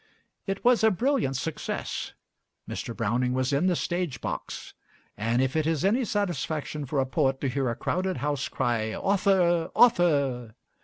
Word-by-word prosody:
It 195 Hz, +2 st, -3 dB
was 245 Hz, -2 st, +5 dB
a 220 Hz, -, +7 dB
brilliant 220 Hz, -, 0 dB
success. 160 Hz, +3 st, -4 dB, 0.5 s
Mr. -, -, -5 dB
Browning 125 Hz, +4 st, 0 dB
was 130 Hz, +2 st, 0 dB
in 150 Hz, +7 st, +2 dB
the 180 Hz, -, +2 dB
stage 170 Hz, -8 st, -2 dB
box; -, -, -5 dB, 0.4 s
and 115 Hz, +4 st, +1 dB
if 130 Hz, +2 st, -1 dB
it 155 Hz, -1 st, +1 dB
is 160 Hz, 0 st, 0 dB
any 235 Hz, +6 st, +2 dB
satisfaction 160 Hz, -, -2 dB
for 140 Hz, +1 st, -1 dB
a 135 Hz, -, +2 dB
poet 135 Hz, -1 st, 0 dB
to 140 Hz, -, 0 dB
hear 130 Hz, 0 st, 0 dB
a 115 Hz, -, -2 dB
crowded 185 Hz, +7 st, -1 dB
house 145 Hz, -1 st, -1 dB
cry 110 Hz, -2 st, -1 dB
"Author, 185 Hz, -4 st, +2 dB
author!" 140 Hz, -, +3 dB
155 Hz, 160 wpm, -27 LUFS, 130-185 Hz, 0.5 s, a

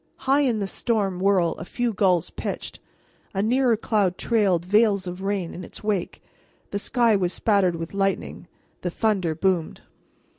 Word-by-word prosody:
High 270 Hz, +2 st, +4 dB
in 255 Hz, -6 st, +2 dB
the 200 Hz, -, -1 dB
storm 195 Hz, -2 st, -1 dB
whirl 185 Hz, -3 st, +3 dB
a -, -, -5 dB
few 240 Hz, +5 st, -2 dB
gulls 180 Hz, -4 st, +2 dB
pitched; -, -, -5 dB, 0.6 s
a 195 Hz, -, +1 dB
nearer 245 Hz, 0 st, +3 dB
cloud 205 Hz, -5 st, 0 dB
trailed 195 Hz, -7 st, +1 dB
veils 205 Hz, -1 st, +3 dB
of 180 Hz, +1 st, -6 dB
rain 195 Hz, -3 st, -2 dB
in 180 Hz, -, -7 dB
its -, -, -11 dB
wake; 205 Hz, -4 st, -2 dB, 0.5 s
the 200 Hz, -, -2 dB
sky 235 Hz, 0 st, +2 dB
was 180 Hz, -2 st, 0 dB
spattered 200 Hz, -5 st, +2 dB
with 165 Hz, +2 st, -6 dB
lightning; 195 Hz, 0 st, -2 dB, 0.3 s
the 180 Hz, -, -2 dB
thunder 185 Hz, -4 st, 0 dB
boomed. 180 Hz, -2 st, 0 dB
195 Hz, 160 wpm, -24 LUFS, 180-220 Hz, 0.6 s, High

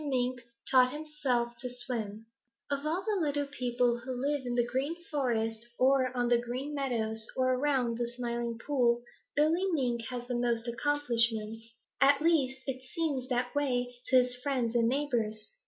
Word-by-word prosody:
MINK 255 Hz, -3 st, 0 dB, 0.3 s
TAUGHT 255 Hz, -1 st, +6 dB
HIMSELF 270 Hz, -6 st, -1 dB
TO 250 Hz, -, -3 dB
SWIM 225 Hz, -4 st, -4 dB, 0.5 s
Of 280 Hz, +1 st, 0 dB
all 350 Hz, +5 st, -1 dB
the 420 Hz, -4 st, 0 dB
little 290 Hz, -1 st, 0 dB
people 245 Hz, -3 st, 0 dB
who 255 Hz, +2 st, -5 dB
live 280 Hz, -1 st, -1 dB
in 240 Hz, -, -1 dB
the 240 Hz, -1 st, +3 dB
Green 265 Hz, +6 st, -1 dB, 0.2 s
Forest 230 Hz, -5 st, -1 dB
or 260 Hz, -1 st, +4 dB
on 245 Hz, 0 st, +2 dB
the 240 Hz, 0 st, +4 dB
Green 255 Hz, +5 st, -4 dB
Meadows 225 Hz, -5 st, -1 dB
or 255 Hz, 0 st, +3 dB
around 255 Hz, -3 st, +1 dB
the 240 Hz, -, 0 dB
Smiling 235 Hz, -1 st, -3 dB
Pool, 240 Hz, -2 st, +1 dB, 0.3 s
Billy 315 Hz, +5 st, +3 dB
Mink 240 Hz, -6 st, 0 dB
has 245 Hz, -1 st, -5 dB
the 250 Hz, -, -3 dB
most 240 Hz, -1 st, 0 dB
accomplishments. 230 Hz, -4 st, 0 dB, 0.3 s
At 280 Hz, +1 st, +6 dB
least, 285 Hz, -5 st, +2 dB
it 260 Hz, -1 st, -3 dB
seems 290 Hz, -7 st, -1 dB
that 245 Hz, -1 st, -1 dB
way 250 Hz, -4 st, 0 dB
to 260 Hz, -, +2 dB
his 250 Hz, -1 st, +4 dB
friends 255 Hz, -4 st, 0 dB
and 230 Hz, -1 st, +3 dB
neighbors. 240 Hz, -6 st, -1 dB
250 Hz, 165 wpm, -31 LUFS, 235-280 Hz, 0.5 s, TAUGHT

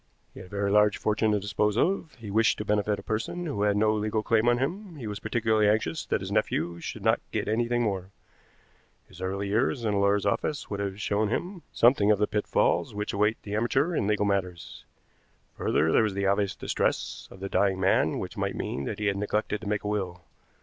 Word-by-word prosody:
He -, -, -11 dB
had -, -, -10 dB
a -, -, -19 dB
very 100 Hz, 0 st, -1 dB
large 105 Hz, 0 st, +4 dB
fortune 105 Hz, 0 st, +1 dB
to 105 Hz, -, +2 dB
dispose 105 Hz, +1 st, 0 dB
of; 175 Hz, +1 st, 0 dB
he 110 Hz, -4 st, -8 dB
wished 110 Hz, +2 st, +3 dB
to 105 Hz, -, -4 dB
benefit 105 Hz, 0 st, +1 dB
a -, -, -9 dB
person 115 Hz, +11 st, -3 dB
who 140 Hz, -10 st, -3 dB
had 105 Hz, 0 st, +2 dB
no 110 Hz, +1 st, +3 dB
legal 110 Hz, 0 st, -1 dB
claim 115 Hz, +1 st, +3 dB
on 120 Hz, -, +3 dB
him; 175 Hz, -, -3 dB
he 130 Hz, -6 st, -8 dB
was 105 Hz, -1 st, -4 dB
particularly 110 Hz, -2 st, +2 dB
anxious 105 Hz, -7 st, 0 dB
that -, -, 0 dB
his -, -, -5 dB
nephew 85 Hz, +2 st, 0 dB
should -, -, -6 dB
not -, -, +3 dB
get -, -, -2 dB
anything 120 Hz, +2 st, +1 dB
more. 95 Hz, -4 st, -2 dB, 1.0 s
His 90 Hz, -1 st, -14 dB
early 100 Hz, +2 st, -2 dB
years 115 Hz, +3 st, +1 dB
in 105 Hz, -, +1 dB
a 100 Hz, -, +1 dB
lawyer's 100 Hz, 0 st, +2 dB
office 135 Hz, +8 st, -1 dB
would 100 Hz, -, -3 dB
have 100 Hz, 0 st, -3 dB
shown 105 Hz, 0 st, 0 dB
him 175 Hz, -, -3 dB
something 115 Hz, -4 st, +4 dB
of 105 Hz, -, +5 dB
the 105 Hz, -, +2 dB
pitfalls 105 Hz, 0 st, 0 dB
which 105 Hz, 0 st, -3 dB
await 105 Hz, +2 st, +1 dB
the 100 Hz, -, -6 dB
amateur 135 Hz, +9 st, +1 dB
in 100 Hz, -, 0 dB
legal 105 Hz, -1 st, +1 dB
matters. 90 Hz, -4 st, -3 dB, 0.7 s
Further, 80 Hz, +1 st, +1 dB
there -, -, +5 dB
was 105 Hz, -3 st, 0 dB
the 100 Hz, 0 st, -1 dB
obvious 100 Hz, 0 st, +1 dB
distress -, -, -2 dB
of 95 Hz, -, -13 dB
the 95 Hz, -, -4 dB
dying 95 Hz, -1 st, +1 dB
man 95 Hz, 0 st, +2 dB
which -, -, -5 dB
might -, -, -2 dB
mean 70 Hz, -, -3 dB
that 105 Hz, -, -4 dB
he 105 Hz, -, -3 dB
had 100 Hz, -1 st, +1 dB
neglected 105 Hz, +1 st, -1 dB
to 110 Hz, -, -7 dB
make 105 Hz, 0 st, -1 dB
a -, -, -3 dB
will. 95 Hz, -4 st, -3 dB
105 Hz, 225 wpm, -27 LUFS, 100-110 Hz, 1.0 s, of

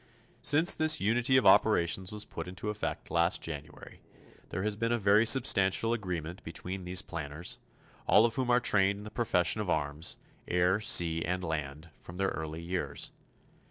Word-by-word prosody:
Since 150 Hz, +4 st, +5 dB
this 155 Hz, 0 st, +3 dB
unity 120 Hz, +6 st, +2 dB
of 130 Hz, -, +2 dB
operations 90 Hz, -3 st, +3 dB
was 105 Hz, 0 st, -5 dB
put -, -, -7 dB
into 95 Hz, +4 st, -5 dB
effect 105 Hz, -, -5 dB
last 85 Hz, +1 st, +2 dB
January, 75 Hz, -2 st, -9 dB, 0.5 s
there 95 Hz, -, -4 dB
has 105 Hz, 0 st, -1 dB
been 115 Hz, +2 st, -1 dB
a 120 Hz, -, +2 dB
very 105 Hz, +1 st, +3 dB
substantial 115 Hz, -3 st, +3 dB
agreement 90 Hz, -5 st, -5 dB
between 90 Hz, +3 st, -7 dB
these 90 Hz, +1 st, +1 dB
planners, 80 Hz, 0 st, -5 dB, 0.5 s
all 110 Hz, -, +6 dB
of 115 Hz, -, 0 dB
whom 130 Hz, 0 st, -2 dB
are 120 Hz, 0 st, +4 dB
trained 100 Hz, -4 st, +2 dB
in 105 Hz, -, -10 dB
the 105 Hz, -, -9 dB
profession 105 Hz, -4 st, +1 dB
of 100 Hz, -, -4 dB
arms 75 Hz, -1 st, -1 dB, 0.3 s
air, 90 Hz, +3 st, +2 dB
sea 85 Hz, -5 st, +2 dB
and 90 Hz, +1 st, -2 dB
land 75 Hz, -1 st, -5 dB
from 85 Hz, -, -11 dB
their 95 Hz, 0 st, 0 dB
early 80 Hz, +1 st, -6 dB
years. 85 Hz, -5 st, -3 dB
95 Hz, 170 wpm, -30 LUFS, 85-110 Hz, 0.5 s, all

